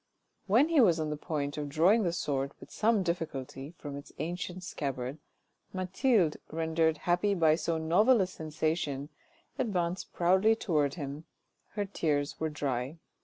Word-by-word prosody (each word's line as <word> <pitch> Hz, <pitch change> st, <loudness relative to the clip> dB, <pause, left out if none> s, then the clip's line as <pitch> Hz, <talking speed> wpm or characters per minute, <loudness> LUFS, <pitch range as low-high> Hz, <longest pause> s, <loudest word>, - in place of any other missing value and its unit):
When 240 Hz, +10 st, +4 dB
he 320 Hz, -5 st, +5 dB
was 175 Hz, -8 st, +4 dB
on 155 Hz, -1 st, -1 dB
the -, -, -1 dB
point 145 Hz, -1 st, -3 dB
of 145 Hz, -1 st, -3 dB
drawing 180 Hz, +10 st, +4 dB
the 175 Hz, -5 st, +1 dB
sword 140 Hz, -4 st, -2 dB
with -, -, -13 dB
some 220 Hz, -2 st, +2 dB
difficulty 155 Hz, -3 st, -4 dB
from 145 Hz, -2 st, -7 dB
its 140 Hz, 0 st, -9 dB
ancient 180 Hz, +3 st, -4 dB
scabbard, 135 Hz, -3 st, -4 dB, 0.5 s
Mathilde, 185 Hz, -, +2 dB
rendered 160 Hz, 0 st, +1 dB
happy 180 Hz, +4 st, +2 dB
by 160 Hz, -3 st, +4 dB
so 165 Hz, +1 st, 0 dB
novel 205 Hz, +10 st, +4 dB
a 190 Hz, -, +3 dB
sensation, 155 Hz, -4 st, -2 dB, 0.5 s
advanced 180 Hz, -6 st, -1 dB
proudly 190 Hz, +5 st, +4 dB
towards 150 Hz, -10 st, 0 dB
him, 145 Hz, -1 st, -6 dB, 0.5 s
her 205 Hz, -2 st, -1 dB
tears 150 Hz, -7 st, -1 dB
were 160 Hz, -, 0 dB
dry. 140 Hz, -1 st, -3 dB
160 Hz, 150 wpm, -30 LUFS, 145-185 Hz, 0.5 s, he